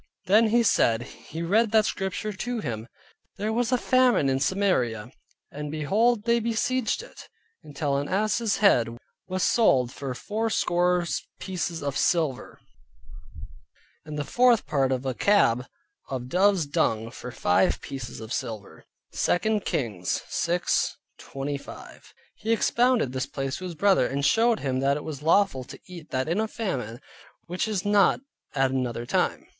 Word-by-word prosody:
Then 215 +4 +5
he 235 +2 +3
said, 115 - +3
he 160 +5 -8
read 215 +6 +3
that 215 -1 +5
Scripture 200 +2 -3
to 240 +4 -3
him, 115 - -5 0.5
"There 210 +2 -2
was 240 +1 0
a 250 - +4
famine 250 - +3
in 135 0 +1
Samaria, 130 - 0 0.4
and 150 +1 -6
behold 205 +10 +1
they 235 +1 +2
besieged 235 - -1
it, - - -13 0.3
until 145 -1 -2
an 145 +1 -3
ass's 215 +3 +1
head 120 - +3 0.3
was 185 0 -2
sold 130 - +3
for 135 -2 -5
four 220 - -2
score 180 -3 +1 0.3
pieces 175 -4 -4
of 140 -1 -2
silver, 155 -7 0 1.4
and 155 -1 -7
the 145 - -1
fourth 245 - +3
part 135 -2 +1
of 130 0 -1
a 130 - -1
cab 125 - +3 0.4
of 125 -2 -4
dove's 190 0 +3
dung 115 -5 0
for 125 0 -8
five 90 -4 +2
pieces 130 -4 -7
of 110 +2 -6
silver" 110 -6 -6 0.3
(2 215 +5 +1
Kings 105 - -2
6.25). 145 -4 -3 0.3
He 225 - -2
expounded 235 - +2
this 130 0 -3
place 135 -1 -4
to 185 - -7
his 175 -2 -6
brother, 195 -6 +3
and 140 +1 -2
showed 230 +3 +3
him 130 -2 -1
that 140 +1 +2
it 150 - -7
was 150 -3 -6
lawful 165 -4 +2
to - - -11
eat 175 -4 -11
that 130 +2 -1
in 170 +5 0
a 220 - 0
famine 130 - -4 0.5
which 180 +5 -2
is 205 -4 -2
not 205 -2 +4 0.4
at 135 -1 +2
another 125 -3 -2
time. - - 0
170 Hz, 155 wpm, -26 LUFS, 130-215 Hz, 1.4 s, Then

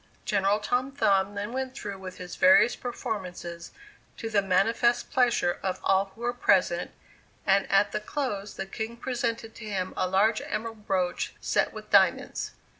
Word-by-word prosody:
General 200 0 +2
Tom 250 +5 -1
Thumb 200 -7 +2
then 205 +3 -4
went 260 0 -3
through 200 -6 -6
with 185 -1 -8
his 180 -1 -7
various 195 +5 +6
performances 185 -8 -5 0.5
to 225 -2 -5
the 205 -2 +3
manifest 225 +6 +2
pleasure 240 -8 +2
of 185 -1 -2
all 195 0 +3
who 230 - -15
were 240 0 0
present, 185 -6 +2 0.6
and 195 0 +2
at 195 +1 +4
the 215 - -1
close 210 -5 -3
the 195 - -4
King 220 +4 -5
presented 235 -2 -3
to 225 - -10
him 190 -3 -3
a 185 - 0
large 205 +4 +3
emerald 220 -1 -5
brooch 180 -2 -1
set - - +1
with - - -10
diamonds. - - +3
205 Hz, 165 wpm, -27 LUFS, 190-235 Hz, 0.6 s, various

